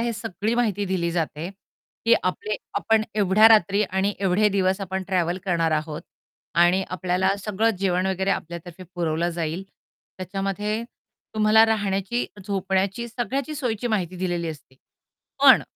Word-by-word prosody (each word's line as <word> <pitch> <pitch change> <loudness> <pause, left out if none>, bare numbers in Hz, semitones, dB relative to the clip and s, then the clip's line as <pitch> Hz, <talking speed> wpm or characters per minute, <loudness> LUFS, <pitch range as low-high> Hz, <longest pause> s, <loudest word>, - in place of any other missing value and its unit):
हे 235 0 0
सगळी 210 +1 -3
माहिती 210 -4 0
दिली 170 -3 0
जाते, 165 -1 -2 0.6
की - - +6
आपले 435 0 -2 0.2
आपण 225 -1 +2
एवढ्या 210 +1 +6
रात्री 205 -2 +4
आणि 190 +2 0
एवढे 195 +2 +3
दिवस 190 -1 +1
आपण 190 0 -3
ट्रॅव्हल 180 -2 0
करणार 170 -4 +1
आहोत. 155 0 -2 0.5
आणि 175 +2 +4
आपल्याला 185 +1 +1
सगळं 210 +2 +1
जेवण 185 -1 +1
वगैरे 190 0 0
आपल्यातर्फे 170 0 -5
पुरवलं 170 -1 0
जाईल. 165 +2 -3 0.5
त्याच्यामध्ये 195 +4 -2 0.5
तुम्हाला 215 +1 +5
राहण्याची, 205 +1 0 0.2
झोपण्याची 195 +3 -1
सगळ्याची 260 +5 -3
सोयीची 245 -5 -2
माहिती 185 -6 -1
दिलेली 175 -2 -2
असते. 145 -4 -9 0.7
पण - - +8
190 Hz, 135 wpm, -24 LUFS, 175-215 Hz, 0.7 s, पण